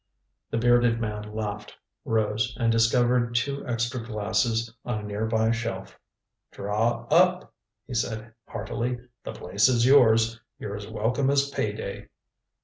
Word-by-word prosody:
The - - -2
bearded 120 0 +3
man 105 -2 -4
laughed, 105 -1 -5 0.3
rose 110 0 0
and 115 -1 +2
discovered 120 +1 +2
two 140 +4 0
extra 120 +1 -2
glasses 115 +1 -1
on 120 -3 -2
a 105 - -6
near 105 +1 -3
by 110 0 +2
shelf. 115 0 -4 0.5
"Draw 110 +4 -1
up," 180 +3 +3 0.3
he 130 - -8
said 110 0 -3
heartily. 120 +3 -3 0.3
"The - - -6
place 100 +6 +1
is 120 -2 +3
yours. 115 -4 +5 0.2
You're 100 -1 -5
as 100 0 -7
welcome 115 +5 0
as 140 0 +2
pay 105 -6 -1
day." 105 -2 -7
115 Hz, 140 wpm, -26 LUFS, 110-120 Hz, 0.5 s, yours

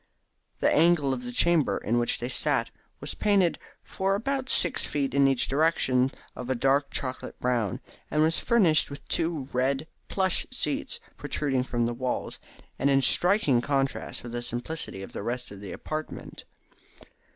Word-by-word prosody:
The - - +3
angle 155 -4 +4
of 125 -1 -5
the 125 - -5
chamber 165 +3 +3
in 120 +3 0
which 120 - +2
they 120 - -3
sat 125 - +1 0.3
was - - -3
painted 200 -5 +2 0.2
for 195 +1 -1
about 260 +4 -2
six 170 - +3
feet 140 -3 -2
in 140 0 +5
each 135 -2 +1
direction 135 -4 +2 0.2
of 125 0 -7
a 130 - +1
dark 140 +3 +2
chocolate 130 -1 -4
brown, 120 -5 0 0.3
and 150 - +2
was 160 +1 +2
furnished 195 -10 +3
with 140 0 -10
two 160 -5 -1
red 135 +3 +1 0.2
plush 190 -2 0
seats - - -1 0.2
protruding 135 -4 -1
from 120 -2 -1
the 120 - -1
walls, 125 +1 -3 0.4
and 140 - +2
in 135 -1 +3
striking 175 - +4
contrast 135 0 -2
with 120 - -7
the 120 0 -3
simplicity 120 -3 -4
of - - -9
the - - -6
rest 120 +2 -4
of 100 -1 -10
the 100 - -7
apartment. 155 0 -6
135 Hz, 165 wpm, -27 LUFS, 125-165 Hz, 0.4 s, in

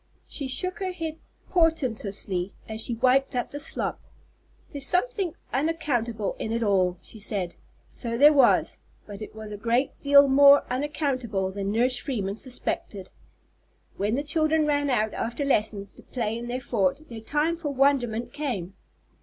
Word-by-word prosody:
She 280 - -1
shook 365 +9 +1
her 380 -1 -2
head 325 -3 -5 0.3
portentously 220 - 0
as 220 0 -2
she 235 - 0
wiped 260 +3 +2
up 245 - -2
the 290 - -5
slop. 295 - -2 0.7
"There's 285 -2 -4
something 370 -2 0 0.2
_on_accountable 245 -7 -1
in 220 - -3
it 230 +1 0
all," 185 -3 +2
she 220 - -11
said. 195 -4 -3 0.4
So 235 -2 -4
there 295 +4 +7
was, 280 - +4 0.3
but 205 0 -9
it 215 - -8
was 215 -1 -8
a 205 - -5
great 235 +5 +1
deal 280 0 +7
more 280 +1 +7
unaccountable 255 -8 -1
than 200 0 -3
Nurse 245 +3 +2
Freeman 205 -8 -3
suspected. 215 -6 -5 0.8
When 205 +3 0
the 285 - -1
children 310 +1 +2
ran 290 -1 +1
out, 220 -4 +1
after 240 +5 -3
lessons, 210 -6 0
to - - -16
play 225 -3 -3
in 235 +1 -5
their 250 +2 -3
fort, 240 +5 -1
their 230 -2 -8
time 300 +7 0
for 330 -3 -4
wonderment 245 -4 +1
came. 225 - -3
250 Hz, 160 wpm, -26 LUFS, 215-290 Hz, 0.8 s, there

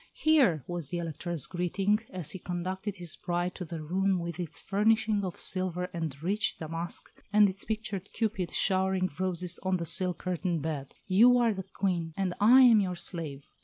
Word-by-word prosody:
"Here," 265 - +4
was 175 -5 -5
the 175 - -3
Elector's 170 -2 -2
greeting, 190 +5 0
as 180 -5 -4
he 190 - -6
conducted 185 +3 -4
his 175 -3 -4
bride 175 0 -2
to 180 - -6
her 160 -1 -6
room 190 +4 +1
with 170 -1 -5
its 170 -4 -4
furnishing 215 +1 +2
of 180 -2 -4
silver 180 -1 -1
and 160 -5 -4
rich 210 +4 0
damask, 165 +2 -4 0.2
and 210 -1 +6
its 190 0 -4
pictured 215 -3 -4
Cupid 195 -6 -1
showering 190 -1 +1
roses 180 -1 0
on 185 -1 0
the 170 - -4
silk 175 +1 +2
curtained 175 -3 -2
bed, 150 -4 -4
"you 230 +6 +6
are 235 -2 +3
the 190 - -4
Queen, 170 -5 -1
and 190 -2 0
I 245 +6 +7
am 235 -4 +7
your 185 -3 -1
slave." 165 -5 -3
185 Hz, 180 wpm, -29 LUFS, 170-200 Hz, 0.2 s, I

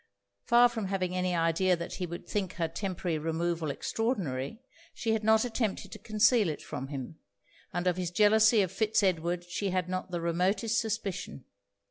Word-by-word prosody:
Far 240 +1 +6
from 230 -4 -4
having 185 -2 -1
any 180 -1 0
idea 165 +2 +2
that 170 0 -6
he 180 - -3
would 170 +1 -8
think 195 -4 -2
her 165 -1 -1
temporary 180 -4 -3
removal 165 0 -1
extraordinary, 180 - -2 0.4
she 225 -2 0
had 220 -1 -1
not 220 +2 +4
attempted 225 -4 -2
to 215 - -8
conceal 215 -1 +3
it 150 - -5
from 140 -3 -5
him; 140 +2 -7 0.5
and 175 0 -2
of 180 -1 +1
his 180 -2 -2
jealousy 215 +3 +5
of 185 - -3
Fitz 220 +1 +1
Edward 175 -1 0
she 195 +3 -2
had 185 -1 -1
not 185 0 -3
the 175 -1 -3
remotest 190 +6 +1
suspicion. 205 - -4
185 Hz, 175 wpm, -30 LUFS, 170-215 Hz, 0.5 s, Far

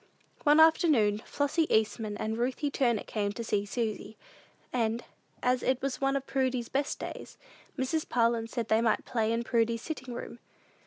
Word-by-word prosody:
One 295 +1 +6
afternoon, 305 - +5
Flossy 290 +3 0
Eastman 215 -1 +1
and 220 +1 -2
Ruthie 255 +5 -1
Turner 240 -6 +1
came 205 -2 -2
to 235 - -5
see 205 -2 -1
Susy; 220 -1 -3 0.6
and, 230 -1 0 0.4
as 250 0 +2
it 260 -1 +1
was 275 -1 -3
one 275 0 +2
of 275 -1 -2
Prudy's 260 -3 -1
best 280 +1 -1
days, - - -8 0.4
Mrs. 275 +4 -1
Parlin 230 -1 +2
said 235 -3 -3
they 220 +1 +4
might 225 -2 +1
play 225 -2 0
in 230 +1 0
Prudy's 230 -1 +1
sitting 260 -6 -5
room. 240 - -7
235 Hz, 165 wpm, -29 LUFS, 220-270 Hz, 0.6 s, One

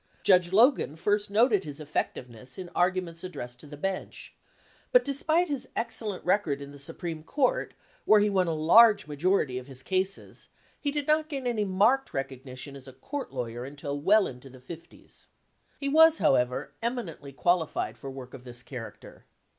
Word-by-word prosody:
Judge 180 -2 +4
Logan 220 - +4
first 205 +5 0
noted 210 -1 +3
his 145 -2 -8
ef 150 -1 -11
fectiveness 125 0 -4
in 180 -2 -7
arguments 180 -2 0
addressed 125 -9 -7
to 150 - -10
the 145 0 -10
bench; 190 +4 -4 0.6
but - - +5
despite 315 +5 +1
his 285 -4 -2
excellent 220 -4 -2
record 180 -7 +1
in 140 0 -9
the 145 - -12
Supreme 160 +3 -5
Court, 255 - 0 0.3
where 215 - +6
he 205 - +3
won 190 -3 +1
a 165 - 0
large 205 +6 +6
majority 150 -3 0
of 125 - -12
his 135 -1 -8
cases, 190 +1 -2 0.3
he 290 - -1
did 290 0 -2
not 310 +1 +2
gain 275 -4 -4
any 230 -4 0
marked 215 +8 +2
recognition 135 0 -6
as 135 -1 -12
a 130 - -11
court 270 - -6
lawyer 120 -2 -4
until 140 +1 -5
well 205 +6 +5
into 125 +1 -8
the 130 0 -14
fifties. 165 +6 -13 0.5
He 280 - -3
was, 320 +2 +6
however, 125 -1 +1
eminently 225 - -4
qualified 170 +3 0
for 135 - -8
work 130 -1 -9
of 130 -2 -10
this 120 -1 -6
character. 125 -3 -10
175 Hz, 175 wpm, -28 LUFS, 135-215 Hz, 0.6 s, where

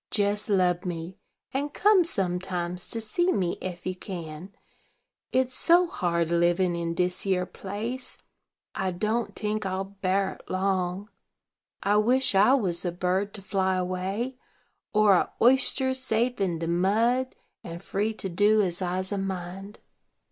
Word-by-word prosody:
Jes 205 +1 0
lub 180 -3 +2
me, 175 -1 -5 0.3
and 285 +2 -2
come 410 -2 +5
sometimes 180 - -2
to 230 - -3
see 345 +12 0
me 180 - -1
ef 175 -2 -6
you 185 - -2
can, 175 -1 -7 0.8
it's 255 0 +1
so 345 +6 +4
hard 170 - -1
livin' 175 +1 +2
in 170 0 -2
dis 180 +1 0
yere 185 -2 +1
place. 220 +7 -5 0.6
I 190 - -1
don't 215 +6 -1
tink 215 0 -2
I'll 190 0 -2
bar 195 0 -1
it - - -19
long. 185 +1 -1 0.7
I 205 +1 +3
wish 250 +4 +3
I 205 +7 +6
was 185 -10 0
a 175 - -1
bird 185 +3 -1
to 200 - -9
fly 190 -1 0
away, 190 +8 -2 0.5
or 210 -2 +5
a 180 - +2
oyster 260 +1 +4
safe 245 -2 -1
in 180 -4 0
de 165 0 -3
mud, 225 +9 +1 0.3
and 170 0 -7
free 205 +4 -2
to 195 - -3
do 205 +4 +3
as 180 -1 -1
I's 185 +1 -2
a 200 - -1
mind." 195 +1 -5
195 Hz, 150 wpm, -27 LUFS, 180-220 Hz, 0.8 s, I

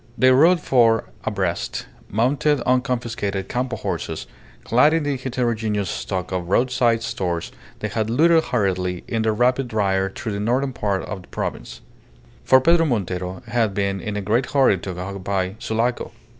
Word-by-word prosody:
They 130 0 +5
rode 165 +7 +5
four 115 -6 +2
abreast, 95 -5 -2 0.2
mounted 135 +6 +1
on 125 +1 +2
confiscated 115 -6 -3
Campo 125 0 -2
horses, - - -4 0.4
clad 150 +7 +4
in 165 - 0
the 145 -1 0
heterogeneous 115 -6 -1
stock 90 -1 -4
of 90 -2 -3
roadside 120 0 +2
stores 90 -6 -3 0.3
they 110 - -1
had 110 +1 -2
looted 160 +6 +4
hurriedly 95 -5 -1
in 115 - -1
their 110 0 +2
rapid 125 +1 +1
ride 95 -2 0
through 115 - -4
the 100 - -3
northern 130 +5 0
part 100 -6 -1
of 95 +1 -6
the - - -18
province; - - -5 0.6
for 130 - +6
Pedro 165 +4 +4
Montero 95 - -3
had 115 -4 0
been 100 -1 -1
in 105 +3 -4
a - - -2
great 115 +6 +1
hurry 130 -9 +3
to 90 -1 -6
occupy 95 0 -2
Sulaco. 115 +1 -1
110 Hz, 160 wpm, -22 LUFS, 95-125 Hz, 0.6 s, for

